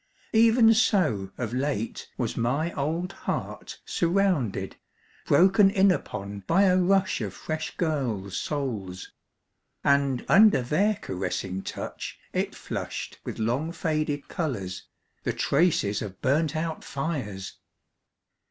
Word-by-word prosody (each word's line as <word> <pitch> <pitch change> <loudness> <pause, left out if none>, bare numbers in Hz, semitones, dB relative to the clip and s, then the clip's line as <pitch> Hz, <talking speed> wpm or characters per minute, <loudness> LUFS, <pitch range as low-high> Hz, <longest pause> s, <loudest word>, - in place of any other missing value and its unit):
Even 225 0 +6
so 180 - +2
of 120 -2 -3
late 125 -4 -2
was - - -2
my 140 +9 0
old 165 +6 -2
heart - - -5
surrounded, 170 - 0 0.5
broken 195 +6 +6
in 195 -1 +4
upon 100 - -4
by 190 +4 +4
a 185 -2 +5
rush 190 +1 +2
of - - -4
fresh 155 0 -4
girls' 120 - -1
souls... 105 -11 -4 0.7
and 140 -2 +2
under 210 - +6
their 195 - +2
caressing 95 - -3
touch - - -6 0.2
it - - -1
flushed - - -5
with - - -6
long 125 +9 -1
faded 155 -3 -2
colours, 105 - -4 0.3
the - - -1
traces 140 - +2
of 100 -3 -7
burnt 150 +4 +1
out 160 0 -3
fires 130 - -4
145 Hz, 115 wpm, -26 LUFS, 110-180 Hz, 0.7 s, Even